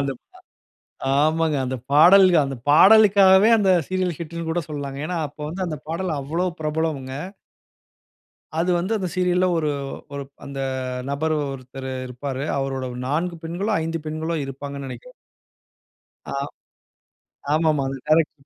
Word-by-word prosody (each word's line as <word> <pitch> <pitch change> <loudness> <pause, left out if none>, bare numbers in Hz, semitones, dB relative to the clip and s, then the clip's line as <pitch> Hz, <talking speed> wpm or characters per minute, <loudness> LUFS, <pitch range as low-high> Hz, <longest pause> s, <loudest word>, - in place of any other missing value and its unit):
அந்த 140 -1 -1
ப - - -60 1.0
ஆமாங்க. 160 0 +2
அந்த 130 +1 -2 0.2
பாடல்க 175 +3 +7 0.3
பாடலுக்காகவே, 195 +3 +7
அந்த 200 -3 +2 0.2
சீரியல் 185 -2 -1
ஹிட்ன்னு 170 0 -6
கூட 165 +2 0
சொல்லலாங்க. 145 -3 -5
ஏன்னா, 180 - -3
அப்ப 145 - -21
வந்து 180 +4 -5
அந்த 155 -2 -4
பாடல் 170 +3 -2
அவ்ளோ 160 +6 -2
பிரபலம்ங்க. 155 -4 -2 1.5
அது 175 +2 +1
வந்து, 185 +5 -2
அந்த 185 -2 -2
சீரியல்‌ல 180 0 +2
ஒரு, 155 -2 0 0.4
ஒரு 140 0 -4 0.2
அந்த 140 -1 -6 0.5
நபர் 155 +3 0 0.2
ஒருத்தரு 130 0 -7
இருப்பாரு. 130 +2 -5
அவரோட 135 -1 -2 0.2
4 170 +5 -1
பெண்களோ! 175 +6 -2
5 165 +1 -2
பெண்களோ 160 +2 -2
இருப்பாங்கனு 140 +1 -7
நினைக்கிறேன். - - -10 1.2
ஆ. - - -4 1.2
ஆமா, 160 +1 +3
ஆமா. 140 -2 0
அது 135 - -5
டைரக்ட்ரு 155 -2 +1
160 Hz, 130 wpm, -23 LUFS, 140-180 Hz, 1.5 s, பாடல்க